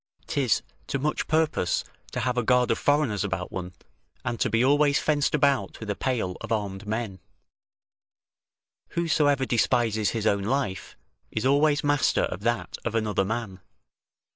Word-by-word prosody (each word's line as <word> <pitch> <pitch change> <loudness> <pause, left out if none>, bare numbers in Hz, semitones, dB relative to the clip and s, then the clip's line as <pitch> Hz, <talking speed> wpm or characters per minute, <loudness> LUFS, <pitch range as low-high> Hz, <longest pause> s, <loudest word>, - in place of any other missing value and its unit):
'Tis 130 -7 +1 0.2
to - - -1
much 150 +3 -1
purpose 155 - +1 0.3
to 125 - -2
have 125 +1 0
a 125 - +2
guard 125 +1 +3
of - - 0
foreigners 145 -9 +2
about 95 -3 -3
one, 90 -1 -5 0.5
and 120 - -2
to - - +1
be 115 +2 +2
always 145 +1 +4
fenced 150 -1 +1
about 140 -2 +1
with 110 -2 -4
a - - -2
pale 110 -9 -1
of - - -7
armed 105 -2 -2
men; 110 -3 -3 1.8
whosoever 145 -5 +2
despises 115 -3 +2
his 110 -2 -3
own 100 -2 +2
life, 105 -4 -2 0.3
is 110 +3 -3
always 145 +2 +3
master 145 -2 +2
of - - -2
that 120 +3 -2
of 115 -1 -3
another 105 -3 +1
man. 105 -2 -4
120 Hz, 155 wpm, -26 LUFS, 105-140 Hz, 1.8 s, always